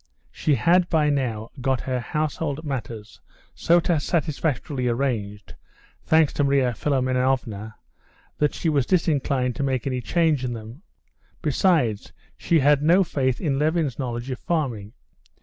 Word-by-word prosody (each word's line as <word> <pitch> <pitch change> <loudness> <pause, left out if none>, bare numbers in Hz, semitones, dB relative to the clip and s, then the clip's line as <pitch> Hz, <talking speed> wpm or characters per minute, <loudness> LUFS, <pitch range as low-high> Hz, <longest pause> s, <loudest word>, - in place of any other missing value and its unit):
She 150 - +1
had 175 +9 +3
by 150 -3 +2
now 115 -6 -2
got 130 -1 0
her 130 -1 -2
household 150 +2 -3
matters 115 -6 -6 0.3
so 170 +1 +3
satisfactorily 155 -4 -1
arranged, 115 -5 -2 0.5
thanks 160 -2 +4
to 145 - 0
Marya 135 -3 +2
Philimonovna, 125 -5 -1 0.6
that 150 -1 +1
she - - -3
was 145 -5 +1
disinclined 140 -8 +1
to - - -3
make 130 -3 -1
any 130 -2 -2
change 155 +1 +1
in 125 -1 -2
them; 115 +5 -9 0.6
besides, 150 - +1 0.2
she 165 -3 +1
had 145 +1 +4
no 175 +6 +4
faith 130 -6 -1
in 140 -5 -1
Levin's 155 -3 0
knowledge 120 0 -4
of 125 - -5
farming. 125 -12 -2
135 Hz, 135 wpm, -24 LUFS, 125-155 Hz, 0.6 s, thanks